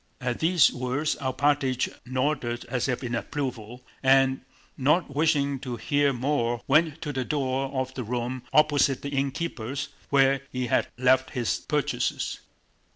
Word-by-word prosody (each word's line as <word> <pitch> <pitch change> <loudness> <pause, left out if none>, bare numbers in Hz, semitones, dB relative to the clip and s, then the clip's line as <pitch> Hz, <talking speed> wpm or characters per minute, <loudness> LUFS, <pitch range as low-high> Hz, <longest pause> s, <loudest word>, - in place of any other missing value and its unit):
At 125 -2 -2
these 165 -1 +4
words 130 +5 -1
Alpátych 135 -1 +1 0.2
nodded 130 -2 -1
as 125 -3 -1
if 125 0 -2
in 120 -1 -3
approval, 125 -2 -4 0.2
and 135 0 +4 0.3
not 145 +3 +1
wishing 145 -3 +2
to 125 -2 -5
hear 145 +5 +1
more 120 -2 -1
went 155 +2 +2
to 150 -2 -3
the 130 -1 -1
door 135 -1 -1
of 130 -1 -2
the 130 - -4
room 120 +2 -3
opposite 145 -3 +3
the 140 - -3
innkeeper's, 140 -2 -3 0.2
where 135 -1 +4
he 125 0 -2
had 120 - +1
left 130 +1 +3
his 120 -3 0
purchases. - - -1
135 Hz, 145 wpm, -26 LUFS, 125-145 Hz, 0.3 s, these